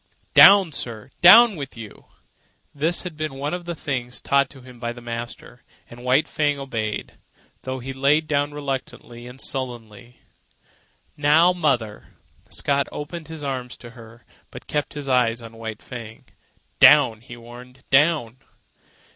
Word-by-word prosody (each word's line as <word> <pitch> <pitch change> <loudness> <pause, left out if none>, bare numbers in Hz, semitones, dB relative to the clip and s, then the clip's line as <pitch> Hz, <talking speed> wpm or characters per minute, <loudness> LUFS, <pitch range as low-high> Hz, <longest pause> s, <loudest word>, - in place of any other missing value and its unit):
"Down, 195 -4 +8
sir! 115 -6 -5
Down 220 +5 +8
with 140 -5 -8
you!" 110 -3 -11 0.7
This 160 +4 -1
had 180 -4 -7
been 155 -3 -5
one 145 +3 -4
of 180 -1 -5
the 170 -1 -5
things 125 -5 -4
taught 140 -1 +1
him 125 -2 -15
by 120 0 -4
the 120 - -12
master, 120 +1 -8 0.3
and 120 +1 -13
White 130 +5 +2
Fang 145 -2 0
obeyed, 115 -6 -5 0.4
though 130 0 -5
he 130 +1 -7
lay 140 +3 +3
down 145 -2 -1
reluctantly 135 -4 -6
and 125 +2 -12
sullenly. 120 -3 -6 1.0
"Now, 155 +5 +4
mother." 130 -11 -2 0.3
Scott 140 0 -1
opened 155 +2 -7
his 160 -2 -8
arms 130 -3 -5
to 120 - -12
her, 115 -1 -15 0.2
but - - -11
kept 150 0 -3
his 145 -1 -6
eyes 125 -3 +2
on 115 -1 -12
White 110 -1 -7
Fang. 115 -3 -10 0.5
"Down!" 130 -7 +6
he 120 0 -12
warned. 125 +2 -14
"Down!" 135 -4 +2
130 Hz, 145 wpm, -22 LUFS, 120-150 Hz, 1.0 s, Down